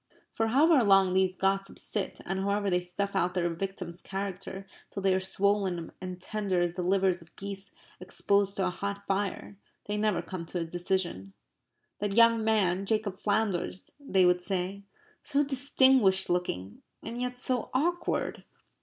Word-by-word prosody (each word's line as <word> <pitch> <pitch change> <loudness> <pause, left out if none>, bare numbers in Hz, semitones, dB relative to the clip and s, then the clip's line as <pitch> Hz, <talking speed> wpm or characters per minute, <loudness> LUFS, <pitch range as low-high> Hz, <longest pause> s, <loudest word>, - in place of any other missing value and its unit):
For 225 - 0
however 280 +3 +5
long 195 -2 +5
these 185 0 +2
gossips 195 +1 -1
sit, 205 -3 -4
and 190 +1 -2
however 200 0 0
they 180 0 +2
stuff 195 +3 -3
out 180 -1 +1
their 175 -2 +1
victims' 180 0 -5
characters 195 0 -5 0.2
till 195 - -6
they 190 -1 +4
are 185 - +2
swollen 190 -2 0
and 185 -1 -6
tender 195 -1 -1
as 175 -1 +1
the 180 - -4
livers 185 0 +2
of 165 - -19
geese 195 0 -6 0.3
exposed 200 +2 +1
to 190 - +1
a 180 - 0
hot 200 +2 -5
fire, 200 0 -2 0.3
they 205 0 -2
never 210 -5 +1
come 170 -1 -6
to 180 - -3
a 165 - -2
decision. 175 - -2 0.7
"That 205 -1 -1
young 230 -1 +5
man, 195 -4 +2
Jacob 215 -3 -1
Flanders," 205 -4 -1
they 195 -10 +2
would 180 0 +3
say, 190 +2 -3 0.4
"so 290 0 +1
distinguished 260 -8 +3
looking 105 - -2 0.2
and 240 +2 -5
yet 250 0 -2
so 250 -1 +1
awkward." 345 +7 -1
195 Hz, 165 wpm, -29 LUFS, 180-210 Hz, 0.7 s, however